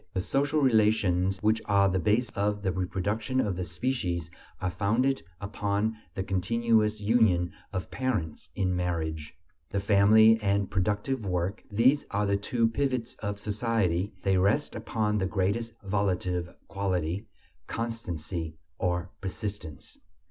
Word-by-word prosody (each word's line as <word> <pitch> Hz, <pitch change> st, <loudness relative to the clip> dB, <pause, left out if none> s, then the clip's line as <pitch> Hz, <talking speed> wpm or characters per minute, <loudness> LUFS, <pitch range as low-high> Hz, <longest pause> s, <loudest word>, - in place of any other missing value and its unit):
The -, -, +1 dB
social 145 Hz, +8 st, +1 dB
relations 105 Hz, -6 st, +3 dB
which 110 Hz, +1 st, +3 dB
are 100 Hz, -1 st, +4 dB
the 95 Hz, -1 st, +1 dB
basis 110 Hz, +6 st, +1 dB
of 105 Hz, 0 st, -1 dB
the 95 Hz, -, +1 dB
reproduction 100 Hz, +7 st, -1 dB
of 105 Hz, -7 st, +1 dB
the 90 Hz, -, -3 dB
species 90 Hz, -7 st, -2 dB, 0.3 s
are 90 Hz, -1 st, -1 dB
founded 120 Hz, +8 st, +1 dB, 0.2 s
upon 105 Hz, +2 st, -1 dB, 0.2 s
the 95 Hz, -, -1 dB
continuous 110 Hz, +3 st, +1 dB
union 100 Hz, -6 st, +3 dB, 0.2 s
of 95 Hz, -, -4 dB
parents 105 Hz, -13 st, -2 dB
in 90 Hz, -2 st, 0 dB
marriage. 80 Hz, -4 st, -2 dB, 0.3 s
The 100 Hz, -, -1 dB
family 110 Hz, +3 st, +6 dB
and 100 Hz, -1 st, +1 dB
productive 105 Hz, +6 st, 0 dB
work: 90 Hz, +1 st, -2 dB
these 125 Hz, +7 st, +3 dB
are 105 Hz, +1 st, 0 dB
the 100 Hz, 0 st, +2 dB
two 115 Hz, +3 st, +1 dB
pivots 125 Hz, 0 st, -1 dB
of 100 Hz, -1 st, -4 dB
society; 105 Hz, -3 st, 0 dB
they 95 Hz, -1 st, +3 dB
rest 105 Hz, +11 st, +2 dB
upon 105 Hz, -2 st, -1 dB
the 95 Hz, -, 0 dB
greatest 100 Hz, +4 st, -1 dB
volitive 90 Hz, -3 st, 0 dB, 0.2 s
quality: 95 Hz, 0 st, -2 dB, 0.4 s
constancy, 85 Hz, -8 st, -4 dB, 0.2 s
or 90 Hz, 0 st, -1 dB
persistence. 95 Hz, -, -6 dB
100 Hz, 135 wpm, -28 LUFS, 90-110 Hz, 0.4 s, family